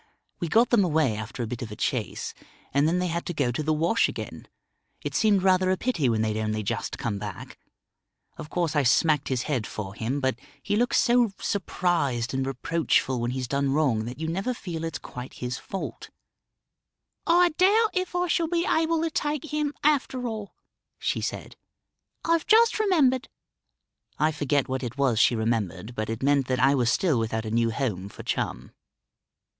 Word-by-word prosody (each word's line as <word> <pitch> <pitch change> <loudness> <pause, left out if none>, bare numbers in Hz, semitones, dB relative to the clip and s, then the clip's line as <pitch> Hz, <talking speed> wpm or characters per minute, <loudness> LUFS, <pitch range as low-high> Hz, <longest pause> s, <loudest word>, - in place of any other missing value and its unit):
We 170 - -2
got 230 +8 +3
them 230 -5 +5
away 155 - +2
after 110 +3 -5
a - - -3
bit 120 +1 -5
of 115 - -5
a - - -6
chase, - - -2 0.4
and 140 +2 +3
then 170 +3 +2
they 180 - 0
had 170 0 -2
to 175 - -3
go 140 -5 +1
to 120 - -2
the 155 +1 0
wash 165 +9 +2
again. - - -7 0.6
It - - -3
seemed 205 -4 +3
rather 185 -1 +4
a 185 - +2
pity 170 - 0
when 110 -1 +1
they'd 110 -1 -1
only 110 0 -1
just 100 - -3
come 115 -7 -2
back. 100 -3 -8 0.8
Of 150 - -9
course 170 -3 -1
I 145 - +4
smacked 145 +3 +3
his 130 -2 -1
head 130 -8 -1
for 95 -3 -6
him; 115 +6 -2
but 130 -3 -1 0.2
he - - 0
looks 240 +3 +2
so 240 -3 +3
surprised 165 - 0
and 135 0 -1
reproachful 135 -2 0
when 120 - -1
he's 130 0 -3
done 140 +1 0
wrong 130 -8 +1
that 125 +4 -7
you 160 - -2
never 195 +9 -2
feel 170 -7 -5
it's 165 -4 -3
quite 125 0 -9
his 125 +1 -4
fault." 195 - -6 1.2
"I 350 +1 +5
doubt 405 +7 +3
if 370 -1 -2
I 355 0 +2
shall 335 0 +1
be 340 +1 0
able 325 0 +2
to 330 - -1
take 300 0 -2
him 300 -1 0
after 275 -4 +1
all," 215 -3 -6 0.4
she - - -1
said. - - -5 0.7
"I've 335 -1 +2
just 455 +1 +5
remembered 295 - +2 0.5
" - - -57 0.3
I 155 +1 +2
forget 145 -2 0
what 130 0 -2
it 120 0 -5
was 130 -6 +2
she 120 - +5
remembered, 110 -2 -2
but 110 -2 -3
it 115 +2 -4
meant 140 -2 +3
that 130 -1 0
I 135 +2 +5
was 125 -4 +2
still 155 -7 +2
without 110 0 -2
a 110 - -4
new 115 0 +2
home 110 -6 -2
for - - -10
Chum. - - -3
145 Hz, 195 wpm, -26 LUFS, -, 1.2 s, them